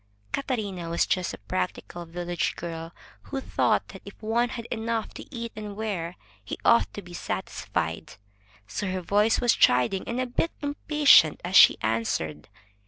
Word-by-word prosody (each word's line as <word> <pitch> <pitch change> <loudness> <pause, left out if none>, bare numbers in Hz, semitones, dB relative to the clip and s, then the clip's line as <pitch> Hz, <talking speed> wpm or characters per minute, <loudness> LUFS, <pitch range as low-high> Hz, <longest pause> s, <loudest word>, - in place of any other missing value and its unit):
Catarina 205 - -3
was 170 - +2
just 180 -2 0
a - - -8
practical 100 - -4
village 175 +1 -2
girl, 165 -1 -6 0.4
who 275 - -2
thought - - +1
that - - -10
if - - -12
one 235 +2 +1
had 235 -2 -6
enough 225 -1 -2
to - - -10
eat 235 -3 -5
and 210 -1 -6
wear, 190 -6 -3 0.3
he - - -5
ought 235 - +5
to 205 - -6
be 175 0 -12
satisfied. - - -3 0.5
So 190 - -3
her 185 0 -2
voice 205 +5 +3
was 240 -1 +4
chiding 125 +10 +3
and 235 +2 -2
a 255 - +1
bit 250 +7 -1
impatient 290 - +5
as 180 +2 -3
she - - +9
answered. 110 -9 -1
195 Hz, 165 wpm, -26 LUFS, 170-235 Hz, 0.5 s, she